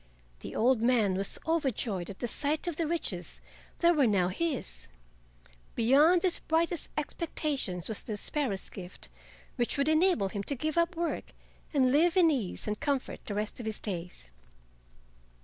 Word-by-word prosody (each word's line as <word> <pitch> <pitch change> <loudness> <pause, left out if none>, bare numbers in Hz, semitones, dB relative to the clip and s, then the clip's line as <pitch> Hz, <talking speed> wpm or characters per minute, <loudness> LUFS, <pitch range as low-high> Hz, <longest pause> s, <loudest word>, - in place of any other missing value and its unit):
The - - -8
old 245 0 +3
man 230 -5 +3
was 195 +1 +1
overjoyed 255 - 0
at 195 - -8
the 240 - -3
sight 295 +7 -1
of 345 -3 -2
the 325 0 -1
riches 200 - -3 0.4
that 345 0 +5
were 280 -5 +4
now 190 -4 +2
his. 255 - -3 0.9
Beyond 290 - +5
his 365 -2 +3
brightest 330 +1 0
expectations 290 - -2
was 220 - -3
the 215 -3 -5
sparrow's 235 -5 -1
gift, 180 -2 -8 0.5
which 240 +2 0
would 280 +1 +1
enable 315 - +3
him 200 +1 -3
to 280 - -2
give 310 +4 -2
up 340 +1 +2
work 335 0 -3 0.4
and 260 -4 +3
live 330 +6 +4
in 335 -3 +6
ease 235 -11 -2
and 210 0 -2
comfort 285 -3 -2
the 205 - -4
rest 210 +3 -3
of 230 - -5
his 220 - -2
days. 175 - -6
260 Hz, 165 wpm, -30 LUFS, 205-320 Hz, 0.9 s, in